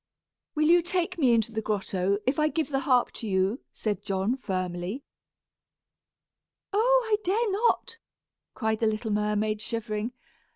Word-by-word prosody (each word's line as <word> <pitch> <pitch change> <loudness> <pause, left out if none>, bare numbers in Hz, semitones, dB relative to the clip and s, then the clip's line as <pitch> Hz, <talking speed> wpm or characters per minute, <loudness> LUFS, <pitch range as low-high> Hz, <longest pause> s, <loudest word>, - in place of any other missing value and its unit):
"Will 305 0 +3
you 345 +1 +6
take 355 +1 -1
me 260 -5 +4
into 230 -1 +2
the 220 0 -2
grotto, 200 -2 0
if 265 +4 +1
I 305 - +4
give 310 -2 -1
the 270 -2 0
harp 255 -2 +2
to 225 - -6
you?" 190 +5 +1
said 210 -2 -2
John, 195 +4 0
firmly. 185 +1 -3 1.7
"Oh! - - +4
I 435 -1 +2
dare 420 +4 +1
not," 460 +2 +1 0.6
cried 220 -1 0
the 225 - +2
little 220 +1 -1
mermaid, 210 0 0
shivering. 225 0 -3
230 Hz, 150 wpm, -27 LUFS, 210-320 Hz, 1.7 s, you